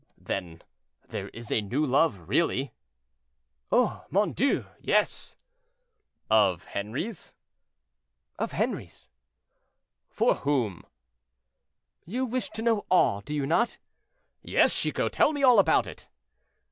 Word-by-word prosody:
"Then 85 Hz, -4 st, -5 dB, 0.5 s
there -, -, -5 dB
is 115 Hz, 0 st, -10 dB
a 110 Hz, -, +2 dB
new 125 Hz, +9 st, -1 dB
love, 125 Hz, -, +1 dB
really?" 135 Hz, -, 0 dB, 1.0 s
"Oh! -, -, +2 dB
mon 205 Hz, +2 st, +1 dB
Dieu! 275 Hz, +4 st, +1 dB
yes." -, -, 0 dB, 0.9 s
"Of 100 Hz, -5 st, +3 dB
Henri's?" 130 Hz, -, -5 dB, 1.0 s
"Of -, -, -2 dB
Henri's." 65 Hz, -, -4 dB, 1.0 s
"For -, -, +2 dB
whom?" 125 Hz, -11 st, -1 dB, 1.2 s
"You 250 Hz, +9 st, -2 dB
wish 255 Hz, +1 st, -2 dB
to 220 Hz, -, -6 dB
know 225 Hz, -3 st, +1 dB
all, 100 Hz, -, +3 dB
do 150 Hz, +9 st, -5 dB
you 145 Hz, -2 st, -1 dB
not?" 175 Hz, -, +1 dB, 0.6 s
"Yes, -, -, +3 dB
Chicot; -, -, -1 dB
tell 310 Hz, -, +3 dB
me 285 Hz, -2 st, -3 dB
all 250 Hz, -5 st, +7 dB
about 195 Hz, -, +4 dB
it." -, -, -11 dB
145 Hz, 115 wpm, -27 LUFS, -, 1.2 s, all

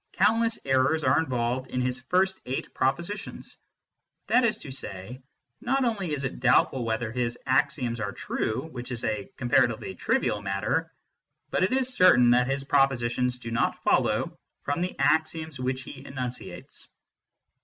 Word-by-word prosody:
Countless 225 Hz, +1 st, +3 dB
errors 135 Hz, +4 st, +2 dB
are -, -, +4 dB
involved 125 Hz, -3 st, -1 dB
in 125 Hz, -, -2 dB
his 125 Hz, 0 st, -1 dB
first 185 Hz, +8 st, +1 dB
eight 130 Hz, -, -4 dB
propositions. 170 Hz, +10 st, -3 dB, 0.7 s
That 250 Hz, -, +3 dB
is 230 Hz, -2 st, +2 dB
to 135 Hz, -, -9 dB
say, 125 Hz, -1 st, -6 dB, 0.4 s
not 265 Hz, +1 st, +1 dB
only 200 Hz, -8 st, -1 dB
is 145 Hz, -2 st, -2 dB
it 130 Hz, -, -4 dB
doubtful 125 Hz, +1 st, +3 dB
whether 110 Hz, 0 st, -2 dB
his 120 Hz, -1 st, -2 dB
axioms 130 Hz, -3 st, +1 dB
are 100 Hz, -2 st, -2 dB
true, 110 Hz, +8 st, -3 dB
which 125 Hz, -2 st, -7 dB
is 120 Hz, -2 st, -3 dB
a 105 Hz, -3 st, -2 dB
comparatively 120 Hz, -1 st, +1 dB
trivial 105 Hz, -, 0 dB
matter, 95 Hz, 0 st, -1 dB, 0.6 s
but -, -, +1 dB
it 190 Hz, -, +2 dB
is 260 Hz, 0 st, 0 dB
certain 125 Hz, -, +6 dB
that 125 Hz, +1 st, +4 dB
his 135 Hz, 0 st, -1 dB
propositions 125 Hz, -2 st, +1 dB
do 115 Hz, -2 st, -7 dB
not 115 Hz, -, 0 dB
follow -, -, +2 dB, 0.3 s
from 145 Hz, +4 st, -1 dB
the 180 Hz, +1 st, -3 dB
axioms 155 Hz, +1 st, +1 dB
which 130 Hz, 0 st, -2 dB
he 135 Hz, 0 st, -10 dB
enunciates. 125 Hz, -3 st, -6 dB
130 Hz, 155 wpm, -27 LUFS, 120-160 Hz, 0.7 s, certain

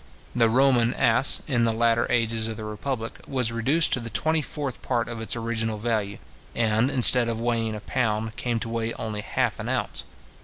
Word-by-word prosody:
The 115 Hz, -2 st, +3 dB
Roman 125 Hz, -1 st, +3 dB
as, 135 Hz, -, +2 dB
in 120 Hz, -4 st, +1 dB
the 115 Hz, -, +2 dB
latter 115 Hz, +1 st, +1 dB
ages 115 Hz, -1 st, +1 dB
of 110 Hz, -1 st, -5 dB
the 110 Hz, -, -7 dB
republic, 115 Hz, +2 st, -5 dB
was 125 Hz, -4 st, -1 dB
reduced 135 Hz, +8 st, +1 dB
to -, -, +1 dB
the 115 Hz, -1 st, -6 dB
twenty 160 Hz, +6 st, 0 dB
fourth 140 Hz, -3 st, -5 dB
part 120 Hz, -2 st, -1 dB
of 115 Hz, -2 st, -6 dB
its 110 Hz, -, 0 dB
original 115 Hz, -1 st, -2 dB
value, 105 Hz, -3 st, -2 dB, 0.4 s
and, 115 Hz, +2 st, +2 dB
instead 125 Hz, -2 st, +7 dB
of 115 Hz, -1 st, -3 dB
weighing 115 Hz, -2 st, -1 dB
a 105 Hz, -, -7 dB
pound, 110 Hz, -2 st, -2 dB
came 120 Hz, -1 st, -2 dB
to 115 Hz, -, -4 dB
weigh 115 Hz, 0 st, -2 dB
only 105 Hz, -2 st, -5 dB
half -, -, -2 dB
an -, -, -4 dB
ounce. -, -, -1 dB
115 Hz, 195 wpm, -25 LUFS, 110-125 Hz, 0.4 s, instead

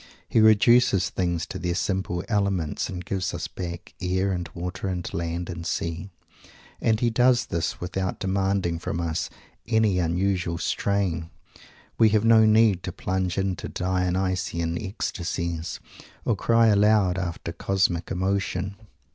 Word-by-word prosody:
He -, -, +2 dB
reduces 110 Hz, -3 st, +5 dB
things 85 Hz, -2 st, -1 dB
to 95 Hz, -, -7 dB
their 90 Hz, -1 st, -1 dB
simple 95 Hz, -2 st, -1 dB
elements 100 Hz, -7 st, 0 dB
and 90 Hz, -1 st, -6 dB
gives 95 Hz, -2 st, -2 dB
us 85 Hz, -, -4 dB
back 85 Hz, -2 st, -7 dB
air 95 Hz, +1 st, 0 dB
and 90 Hz, -2 st, -3 dB
water 90 Hz, +3 st, -4 dB
and 90 Hz, -2 st, -3 dB
land 85 Hz, +1 st, -3 dB
and 85 Hz, -1 st, -6 dB
sea. 85 Hz, +2 st, -3 dB, 0.7 s
And 110 Hz, -1 st, +2 dB
he 120 Hz, -1 st, +2 dB
does 125 Hz, +1 st, +3 dB
this 85 Hz, -1 st, -2 dB
without 95 Hz, +1 st, -3 dB
demanding 95 Hz, -3 st, 0 dB
from 85 Hz, -, -3 dB
us 85 Hz, -1 st, -2 dB, 0.4 s
any 110 Hz, -5 st, +2 dB
unusual 90 Hz, 0 st, 0 dB
strain. 90 Hz, -2 st, -1 dB, 0.7 s
We 110 Hz, -, +7 dB
have 105 Hz, +1 st, +2 dB
no 110 Hz, -1 st, +6 dB
need 110 Hz, -4 st, +4 dB
to 90 Hz, -, -4 dB
plunge 95 Hz, 0 st, -2 dB
into 95 Hz, -2 st, -2 dB
Dionysian 90 Hz, -2 st, -1 dB
ecstacies, 85 Hz, -4 st, -3 dB, 0.5 s
or -, -, +2 dB
cry 115 Hz, -1 st, +4 dB
aloud 100 Hz, -3 st, +4 dB
after 85 Hz, -2 st, -4 dB
"cosmic 90 Hz, -1 st, 0 dB
emotion." 95 Hz, +1 st, -1 dB
95 Hz, 140 wpm, -25 LUFS, 85-100 Hz, 0.7 s, We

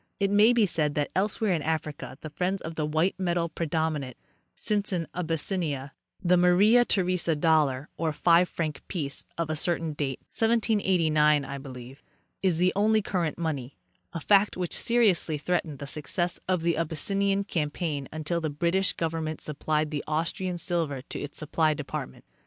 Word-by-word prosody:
It 200 Hz, -1 st, +1 dB
may 210 Hz, +3 st, +6 dB
be 235 Hz, -3 st, +4 dB
said 150 Hz, -5 st, 0 dB
that 145 Hz, -1 st, -1 dB
elsewhere 210 Hz, +2 st, +1 dB
in 165 Hz, -4 st, +1 dB
Africa 155 Hz, -3 st, -3 dB
the 155 Hz, -, -7 dB
friends 185 Hz, +5 st, -1 dB
of 160 Hz, -, -5 dB
the 155 Hz, -2 st, -2 dB
white 160 Hz, +5 st, +1 dB
metal 175 Hz, -2 st, 0 dB
predominate, 155 Hz, -5 st, -2 dB, 0.4 s
since 205 Hz, -2 st, -1 dB
in 170 Hz, -4 st, -1 dB
Abyssinia 160 Hz, -4 st, -2 dB, 0.3 s
the 180 Hz, 0 st, +4 dB
Maria 195 Hz, +7 st, +5 dB
Theresa 180 Hz, -6 st, +1 dB
dollar 150 Hz, -3 st, +2 dB
(or 160 Hz, -1 st, 0 dB
five 170 Hz, +3 st, +4 dB
frane 155 Hz, -3 st, -2 dB
piece) 145 Hz, -7 st, -2 dB
of 165 Hz, -2 st, -1 dB
a -, -, -1 dB
certain 165 Hz, -1 st, 0 dB
date—1789, 155 Hz, -, +1 dB
I 140 Hz, 0 st, -5 dB
belieye—is 135 Hz, +7 st, -5 dB
the 180 Hz, +2 st, +3 dB
only 215 Hz, +1 st, +3 dB
current 175 Hz, -6 st, -1 dB
money, 145 Hz, -6 st, -3 dB, 0.3 s
a 165 Hz, -, -4 dB
fact 200 Hz, +3 st, +3 dB
which 180 Hz, -2 st, -3 dB
seriously 205 Hz, -10 st, +2 dB
threatened 160 Hz, -1 st, -1 dB
the 140 Hz, -, -6 dB
success 155 Hz, +5 st, -2 dB
of 180 Hz, -3 st, 0 dB
the 170 Hz, -2 st, +1 dB
Abyssinian 195 Hz, +5 st, 0 dB
campaign 150 Hz, -5 st, -2 dB
until 155 Hz, +2 st, -2 dB
the 160 Hz, -, -1 dB
British 170 Hz, +6 st, +1 dB
government 160 Hz, -1 st, -3 dB
supplied 150 Hz, +1 st, -2 dB
Austrian 170 Hz, +3 st, -2 dB
silver 165 Hz, -7 st, -2 dB
to -, -, -7 dB
its 145 Hz, -, -7 dB
supply 155 Hz, 0 st, +1 dB
department. 140 Hz, -, -6 dB
165 Hz, 155 wpm, -27 LUFS, 150-185 Hz, 0.4 s, may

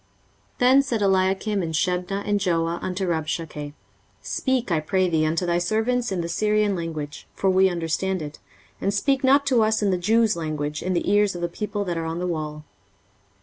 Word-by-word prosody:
23:036:011 -, -, -38 dB
Then 255 Hz, +2 st, +6 dB
said 245 Hz, -6 st, -2 dB
Eliakim 195 Hz, +2 st, +1 dB
and 165 Hz, -2 st, -3 dB
Shebna 180 Hz, +4 st, -1 dB
and 205 Hz, 0 st, +2 dB
Joah 170 Hz, -3 st, 0 dB
unto 185 Hz, +1 st, -2 dB
Rabshakeh, 155 Hz, -2 st, -3 dB, 0.5 s
Speak, 260 Hz, -6 st, -1 dB
I 165 Hz, -, +3 dB
pray 185 Hz, +4 st, +1 dB
thee, 160 Hz, -2 st, +1 dB
unto 165 Hz, +3 st, 0 dB
thy 175 Hz, 0 st, +1 dB
servants 225 Hz, +6 st, 0 dB
in 185 Hz, -2 st, -1 dB
the 170 Hz, -, -3 dB
Syrian 210 Hz, +3 st, +1 dB
language; 160 Hz, -4 st, -5 dB
for 195 Hz, -, +2 dB
we 190 Hz, +1 st, +4 dB
understand 175 Hz, +1 st, -2 dB
it: 150 Hz, 0 st, -8 dB, 0.4 s
and 195 Hz, -, +1 dB
speak 270 Hz, +6 st, +1 dB
not 280 Hz, +2 st, +4 dB
to 255 Hz, -4 st, +3 dB
us 220 Hz, 0 st, +2 dB
in 200 Hz, -, +2 dB
the 180 Hz, -, 0 dB
Jews' 220 Hz, +3 st, +3 dB
language, 150 Hz, -2 st, -3 dB
in 185 Hz, -, -1 dB
the 175 Hz, -, -1 dB
ears 205 Hz, -2 st, +3 dB
of 175 Hz, -, -5 dB
the 175 Hz, -, 0 dB
people 205 Hz, +3 st, -3 dB
that 175 Hz, -2 st, -2 dB
are 165 Hz, -, -3 dB
on 165 Hz, +1 st, -3 dB
the 180 Hz, -, -2 dB
wall. 155 Hz, -3 st, -4 dB
185 Hz, 200 wpm, -24 LUFS, 165-210 Hz, 0.5 s, Then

